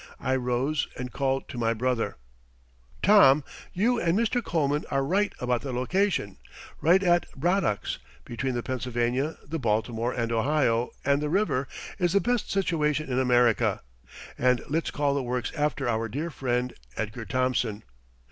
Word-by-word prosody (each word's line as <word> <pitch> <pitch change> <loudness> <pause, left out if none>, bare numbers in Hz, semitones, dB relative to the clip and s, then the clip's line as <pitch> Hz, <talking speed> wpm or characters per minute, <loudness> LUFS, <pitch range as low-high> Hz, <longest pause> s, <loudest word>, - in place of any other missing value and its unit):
I 130 0 0
rose 130 +4 0
and 125 0 -5
called 135 -1 -1
to 125 - -6
my 115 0 +1
brother: 125 0 -1 0.9
"Tom, 150 -9 +7 0.3
you 235 +6 +1
and 170 +2 +2
Mr. 235 +2 +1
Coleman 150 -5 0
are 135 0 +1
right 200 +6 +1
about 125 -1 0
the 135 - -5
location; 125 - 0 0.4
right 180 +5 +4
at 175 -2 +3
Braddock's, 170 - 0 0.3
between 125 +2 -3
the 120 - -2
Pennsylvania, 125 +3 -1
the 160 +3 -4
Baltimore 115 0 0
and 115 -2 -2
Ohio, 120 -1 +2 0.2
and 140 +1 +3
the 150 - -1
river, 160 -8 +1 0.3
is 175 -2 +1
the 200 - +5
best 245 +1 0
situation 155 -6 0
in 125 - +1
America; 125 -3 +3 0.6
and 125 -1 +3
let's 160 +4 -1
call 145 -1 0
the 140 - 0
works 125 -1 -2
after 150 -3 0
our 115 -1 0
dear 150 +9 -3
friend 125 -2 -1 0.2
Edgar 110 +1 -4
Thomson. 120 -2 0
135 Hz, 155 wpm, -27 LUFS, 120-160 Hz, 0.9 s, Tom